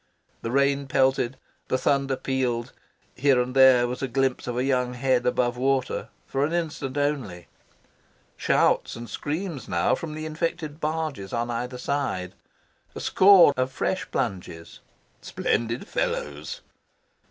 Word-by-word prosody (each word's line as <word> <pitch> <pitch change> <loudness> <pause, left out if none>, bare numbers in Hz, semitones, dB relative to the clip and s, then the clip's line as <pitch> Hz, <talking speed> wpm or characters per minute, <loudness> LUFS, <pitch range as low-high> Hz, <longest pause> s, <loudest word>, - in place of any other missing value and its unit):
The 115 - -4
rain 140 +2 +2
pelted, 130 -1 +1 0.3
the 130 - +1
thunder 135 0 +1
pealed. 125 -3 -2 0.4
Here 135 -1 +3
and 125 +1 -2
there 130 -2 +6
was 125 +1 -5
a 135 - -1
glimpse 130 0 0
of 120 0 -3
a 125 - +1
young 125 -2 0
head 125 -1 +1
above 125 -1 +1
water 135 +1 0 0.2
for 135 - -1
an 155 +3 0
instant 155 -5 -3
only. 130 - -2 0.9
Shouts - - +2
and 115 0 -8
screams 155 - -4
now 85 -1 +2
from 155 -2 -4
the 155 0 -5
infected 155 -1 -3
barges 155 -10 -3
on 120 +1 -1
either 125 +2 -4
side. 125 -10 -2 0.6
A - - -5
score 190 -6 +6
of 130 +1 -1
fresh 185 +7 -2
plunges. 90 -6 -4 0.4
"Splendid 115 - -2
fellows!" - - -3
130 Hz, 140 wpm, -25 LUFS, 120-145 Hz, 0.9 s, there